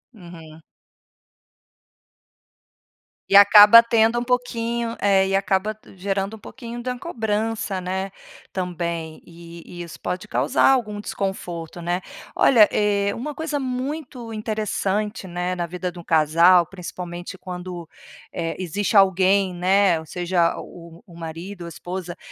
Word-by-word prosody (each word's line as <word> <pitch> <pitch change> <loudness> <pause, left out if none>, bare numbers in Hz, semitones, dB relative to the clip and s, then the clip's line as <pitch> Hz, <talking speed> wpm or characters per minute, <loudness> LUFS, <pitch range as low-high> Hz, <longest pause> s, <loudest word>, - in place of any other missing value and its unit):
Uhum. 165 -4 -13 2.7
E 200 - +7
acaba 210 +3 +9
tendo 230 0 +2
um 240 - -3
pouquinho 235 -2 -2
é, 195 -1 +4
e 195 - 0
acaba 195 +2 0 0.2
gerando 195 +2 -2
um - - -14
pouquinho 235 +3 -9
da 250 0 -3
cobrança, 220 - -2
né, 190 +1 -3 0.4
também. 170 -3 -4
E 170 0 -13
e 175 0 -9
isso 170 -2 -9
pode 180 +1 -4
causar 125 +5 +2
algum 215 -6 0
desconforto, 175 -5 -5
né? 175 +2 -2 0.3
Olha, 225 -6 +6
eh, 200 -1 +1
uma 295 +6 -5
coisa 315 -2 -3
muito 255 -2 -5
interessante, 215 -1 -2
né, 180 +1 -3
na 175 - -2
vida 180 +2 -4
de 175 - -15
um - - -10
casal, 165 +3 +4
principalmente, 175 0 -8
quando, 180 -2 -7 0.5
eh, 165 0 -3
existe 200 +4 0
alguém, 190 0 +4
né, 185 -1 +3
ou 160 - -10
seja, 175 0 0
o 170 -1 -12
o 170 - -15
marido 170 +4 -8
ou - - -6
a - - -6
esposa 175 +1 -7
190 Hz, 135 wpm, -22 LUFS, 175-215 Hz, 2.7 s, acaba